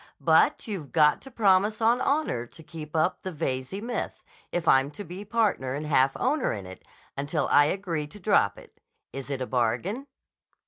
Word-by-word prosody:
But - - +3
you've 185 -10 -5
got 150 -2 +4
to 270 - -11
promise 210 -2 +3
on 235 +2 +3
honor 275 - 0
to 160 - -12
keep 155 -1 -9
up 160 +3 +1
the 185 - -5
Veyze 140 +5 -3
myth, 240 +1 -4 0.3
if 175 -2 -2
I'm 135 +1 +5
to 150 +8 -8
be 185 +2 -8
partner 205 - 0
and 150 +2 -4
half 135 -2 +3
owner 300 -3 +1
in 100 -3 -6
it, 95 0 -10 0.3
until 145 +3 -1
I 145 - +6
agree 165 -3 -2
to 205 +7 -13
drop 180 - +2
it. - - -16 0.3
Is 135 -1 -6
it 135 -2 -2
a - - -3
bargain?" 125 - -1
160 Hz, 185 wpm, -27 LUFS, 135-205 Hz, 0.3 s, I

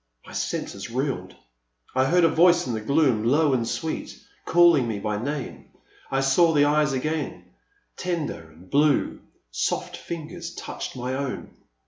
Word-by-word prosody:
My - - -12
senses 100 +3 -3
reeled. 130 +3 -3 0.6
I 130 0 +3
heard 175 +5 +3
a - - +7
voice 170 +2 +4
in 125 - -3
the 110 - -3
gloom, 130 -2 +2
low 145 +4 +3
and 120 -3 0
sweet, 160 +5 -4 0.3
calling 170 -7 +5
me 110 -2 -2
by 105 +1 -2
name; 145 -1 -5 0.4
I 135 0 +1
saw 160 +5 +4
the 145 -1 +5
eyes 150 0 +3
again, 155 +4 -3 0.5
tender 160 - -3
and 80 +4 -17
blue; 145 +5 +2 0.3
soft - - -2
fingers 170 +1 -7
touched - - -6
my 125 +1 -3
own. 135 -1 -4
140 Hz, 150 wpm, -25 LUFS, 125-160 Hz, 0.6 s, a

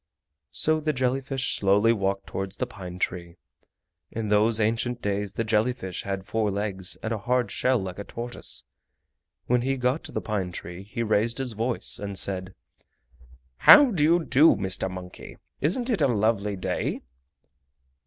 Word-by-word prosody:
So 155 0 +3
the 155 0 -1
jelly 130 0 0
fish 135 0 -1
slowly 105 +3 +3
walked 100 -2 -2
towards 95 0 -4
the - - -2
pine 90 -3 -9
tree. 85 -2 -3 0.7
In 110 -2 -4
those 110 +2 +3
ancient 115 +3 0
days 100 -1 -3
the 115 - -1
jelly 110 +3 +1
fish 95 -7 -6
had 95 -1 -4
four 110 0 -1
legs 100 -2 -3
and 110 - -2
a 110 - -3
hard 120 -1 0
shell 130 0 +1
like 95 -3 -5
a - - -4
tortoise. 120 +3 -5 0.8
When 125 0 +2
he 135 +2 -1
got 125 +4 0
to - - -7
the - - -2
pine 100 -4 -3
tree 90 +1 -7
he 105 +4 -4
raised 110 +2 +1
his 135 -2 -2
voice 115 +3 0
and 100 -1 -5
said: 95 -1 +3 1.0
"How 290 -4 +8
do 170 -8 0
you 165 +2 +3
do, 150 +5 +5
Mr. 95 -1 -1
Monkey? 90 -1 -10 0.2
Isn't 200 - 0
it 230 -6 0
a - - +4
lovely 105 -3 0
day?" 90 - -3
110 Hz, 170 wpm, -25 LUFS, 95-125 Hz, 1.0 s, How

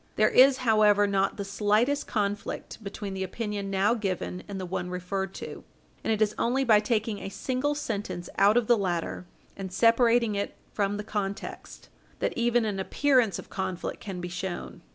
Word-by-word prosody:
There 215 0 +4
is, 260 +1 +7
however, 210 -2 +5
not 195 -1 +1
the 200 - -3
slightest 215 +8 +1
conflict 205 0 -3
between 200 0 -5
the 190 - -4
opinion 205 0 -4
now 195 +3 +2
given 190 -4 -3
and 200 -1 -5
the 185 - -4
one 180 0 -3
referred 190 +2 -3
to, - - -7 0.4
and - - 0
it 215 0 +3
is 210 0 0
only 260 +3 +2
by 220 -5 +6
taking 215 -1 -1
a - - -5
single 260 +7 -1
sentence 205 -10 -4
out 205 +3 +6
of 245 - +3
the 235 -1 +4
latter 175 -1 -2 0.3
and 190 -2 -6
separating 230 +2 +4
it 200 0 -3 0.2
from 205 0 0
the 210 - -4
context 200 -2 -5 0.3
that - - -1
even 240 0 +2
an 205 -3 -2
appearance 250 -1 +2
of - - -10
conflict 190 -2 -3
can 190 -3 -6
be 175 - -4
shown. 175 +1 -5
205 Hz, 180 wpm, -27 LUFS, 195-230 Hz, 0.4 s, is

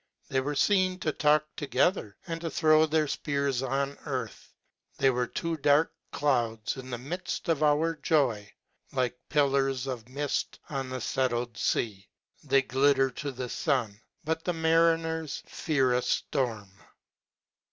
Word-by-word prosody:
They 130 - +1
were 145 +2 -3
feen 185 +2 +2
to 155 - 0
talk 150 0 +3
together, 145 - 0
and 165 -1 -4
to 170 - -3
tlirow 155 -1 +4
their 155 0 +2
jpears 140 -3 -1
on 135 +1 -2
earth. 130 -6 -5 0.5
They 135 - +4
were 125 -1 -1
two 165 +5 -3
dark 145 +2 +3 0.2
clouds, 120 -6 0
in 130 -1 -9
the 120 - -3
midft 160 +9 -5
of 160 -3 +1
our 155 +2 +3
joy 125 -10 +1 0.4
•, - - -15
like 125 -1 0
pillars 135 -3 +2
of 125 -3 -5
mift 145 +2 -2
on 135 -2 -3
the 130 -1 -4
fettled 120 -3 -1
fea. 100 -4 -1 0.3
They 135 -2 +3
glitter 135 0 +3
to 140 +3 -5
the 130 -1 -5
fun, 120 -7 -1 0.2
but 160 +1 -2
the 180 - 0
ma 160 -1 0
riners 165 -2 +1
fear 135 -6 +1
a 125 - +2
ftorm. 115 -6 -1
140 Hz, 150 wpm, -28 LUFS, 125-155 Hz, 0.5 s, tlirow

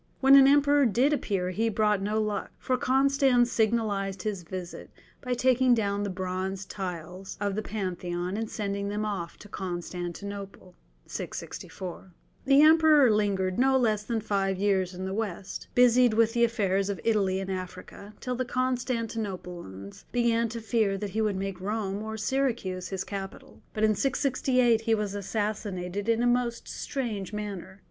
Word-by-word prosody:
When 270 0 +6
an 270 -1 +9
emperor 285 -1 +5
did 255 +7 +2
appear 190 -10 -1
he 225 +5 0
brought 210 -2 +1
no 210 +2 0
luck, 210 -1 -2
for 255 - 0
Constans 265 -2 +3
signalized 205 -4 0
his 210 -4 -2
visit 180 +1 -7 0.3
by 250 -1 -1
taking 255 0 +4
down 200 -2 0
the 205 - -2
bronze 185 +1 -3
tiles 180 0 -6
of 200 -1 -1
the 215 - -2
Pantheon 180 -3 -3
and 220 0 -3
sending 200 -1 -3
them 210 +1 -2
off 190 -5 -4
to 210 - -13
Constantinople. 185 +1 -6 0.3
The 190 - -3
Emperor 310 -5 +6
lingered 195 -3 +1
no 265 +1 +4
less 215 -5 +2
than 225 0 -2
five 195 -3 0
years 190 -2 +1
in 185 +1 -5
the 190 - -3
West, 200 -3 -4
busied 245 -1 +5
with 230 0 +3
the 235 -1 +4
affairs 200 -4 0
of 200 - -3
Italy 200 -4 +2
and 195 0 -4
Africa, 185 +3 -7
till 250 - -3
the 255 +1 -1
Constantinopolitans 220 - -3
began 235 -1 +2
to 230 +1 -6
fear 220 -3 +1
that 200 0 -4
he 220 - -1
would 210 -2 +1
make 195 -1 -4
Rome 205 0 -2
or 220 0 -5
Syracuse 220 -6 -1
his 190 -1 -3
capital. 195 -1 -8
But 215 - -3
in 215 0 +5
668 255 -2 +2
he 225 0 +2
was 210 -2 -2
assassinated 205 -1 -3
in 230 +1 +2
a - - +3
most 240 -1 0
strange 220 -8 -4
manner. 200 -2 -6
210 Hz, 160 wpm, -28 LUFS, 190-235 Hz, 0.3 s, an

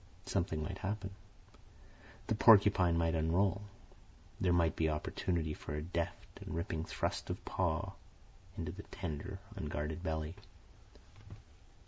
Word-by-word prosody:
Something 85 -5 0
might 95 +3 -4
happen. 100 0 -3 1.1
The - - +1
porcupine 100 -6 +7
might 85 0 +2
unroll. 90 +5 +2 0.8
There 90 - +3
might 85 -2 +3
be 80 -1 +2
opportunity 80 +1 -1
for 75 - -5
a 75 - -2
deft 85 0 -3
and - - -5
ripping 85 -2 -2
thrust - - -2
of - - -4
paw 90 +1 0 0.7
into 80 -2 -2
the 95 +4 -8
tender, 90 0 -5 0.2
unguarded 75 -2 -3
belly. 80 -2 -2
85 Hz, 120 wpm, -35 LUFS, 80-95 Hz, 1.1 s, porcupine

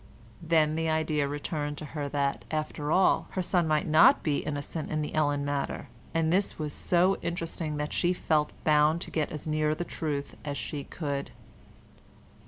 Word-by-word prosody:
Then 160 -2 +3
the 160 0 0
idea 155 -2 +1
returned 145 0 -3
to 155 - -6
her 145 -2 -3
that, 140 -1 -1
after 155 -1 -2
all, 185 +2 +4
her 185 - -1
son 175 -2 +2
might 155 -1 +2
not 155 +1 +6
be 145 -3 +1
innocent 145 +2 -4
in 155 -1 -1
the 150 - -5
Ellen 145 -2 +1
matter—and 160 +3 -2
this 195 +2 +1
was 150 -2 -3
so 180 +2 +2
interesting 165 -2 -3
that 150 0 -3
she 175 - +2
felt 155 -4 +1
bound 155 +1 +4
to - - -5
get 155 -2 -1
as 150 - -6
near 155 0 +1
the 175 - -3
truth 145 -4 -3
as 145 -1 -3
she 145 -2 -5
could. 140 -4 -4
155 Hz, 175 wpm, -29 LUFS, 145-165 Hz, -, not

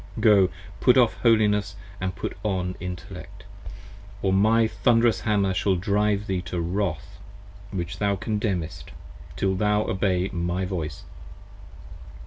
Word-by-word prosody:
Go, 100 -4 +5 0.3
put - - +5
off - - +5
Holiness 105 -3 +2 0.2
And 95 -1 -3
put - - -5
on 90 -3 -2
Intellect: 90 -1 -8 0.8
or 95 -1 +2
my 110 +4 +4
thund'rous 115 -2 +2
Hammer 100 0 +1
shall 95 +1 +1
drive 105 +2 0
thee 95 -3 -1
To 90 0 -4
wrath 90 +3 -3 0.5
which 85 -3 -5
thou 100 -1 +1
condemnest: 100 -5 -3 0.5
till 95 -1 0
thou 105 +2 +2
obey 95 -2 0
my 90 +1 -1
voice. 80 -5 -4
95 Hz, 120 wpm, -25 LUFS, 90-105 Hz, 0.8 s, Go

